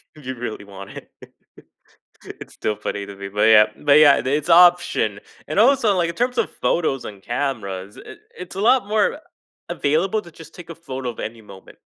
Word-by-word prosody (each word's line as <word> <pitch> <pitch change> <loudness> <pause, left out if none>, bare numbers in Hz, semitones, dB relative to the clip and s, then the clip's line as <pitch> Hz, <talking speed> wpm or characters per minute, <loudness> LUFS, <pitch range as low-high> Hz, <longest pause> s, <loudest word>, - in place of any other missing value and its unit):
if 150 -4 -16
you 130 0 -5
really 115 -4 -6
want 100 0 -11
it. - - -12 1.3
It's - - -12
still 105 - -2
funny 100 0 -5
to 100 - -10
me, 100 0 -7
but 105 +1 -2
yeah 110 -1 +6 0.2
but 145 +1 +6
yeah, 140 -7 +6
it's 145 +4 -1
option. 175 - +4 0.3
And 155 - -3
also, 230 -4 +4
like, 170 -2 +1
in 170 - -5
terms 245 0 -2
of 230 - 0
photos 145 -6 -1
and 100 -2 -10
cameras, 105 -7 -4
it - - -12 0.2
it's 180 +1 -9
a - - -3
lot 240 -1 +3
more 215 +6 +1 0.5
a - - -4
available 175 +9 0
to 170 - -14
just 160 0 -15
take 175 -2 -12
a - - -7
photo 135 -6 -6
of 115 - -10
any 115 0 -7
moment. 95 -2 -15
140 Hz, 200 wpm, -21 LUFS, 105-175 Hz, 1.3 s, yeah